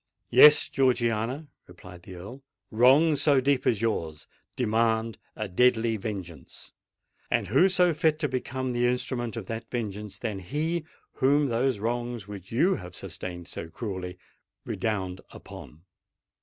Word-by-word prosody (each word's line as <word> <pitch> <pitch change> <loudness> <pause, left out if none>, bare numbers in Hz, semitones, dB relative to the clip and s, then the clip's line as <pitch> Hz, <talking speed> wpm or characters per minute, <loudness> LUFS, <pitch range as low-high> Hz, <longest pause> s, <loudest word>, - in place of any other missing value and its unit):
"Yes, 150 0 +8
Georgiana," 125 +1 0 0.2
replied 90 0 -13
the 90 +1 -11
Earl: 100 +10 -10 0.3
"wrongs 135 +7 +4
so 140 -3 +4
deep 135 0 +1
as 110 -2 +1
yours 80 -9 -2 0.3
demand 115 -1 0 0.2
a 110 - -4
deadly 115 +3 +2
vengeance. 95 -7 -7 0.6
And - - 0
who 190 - +5
so 180 -2 +3
fit 155 -1 +1
to 155 -1 -1
become 130 0 -3
the 120 0 +2
instrument 120 -1 -2
of 110 - -5
that 115 +2 -6
vengeance, 105 -4 -5
than 110 -5 -4
he 155 - -2 0.3
whom 145 +2 +3
those 125 -1 0
wrongs 120 0 -3
which 100 -2 -10
you 170 +12 +2
have 90 -1 -10
sustained 90 -1 -7
so 85 - -7
cruelly 95 -1 -6 0.5
redound 95 -5 -3
upon? 75 +3 -12
115 Hz, 140 wpm, -27 LUFS, 100-130 Hz, 0.6 s, Yes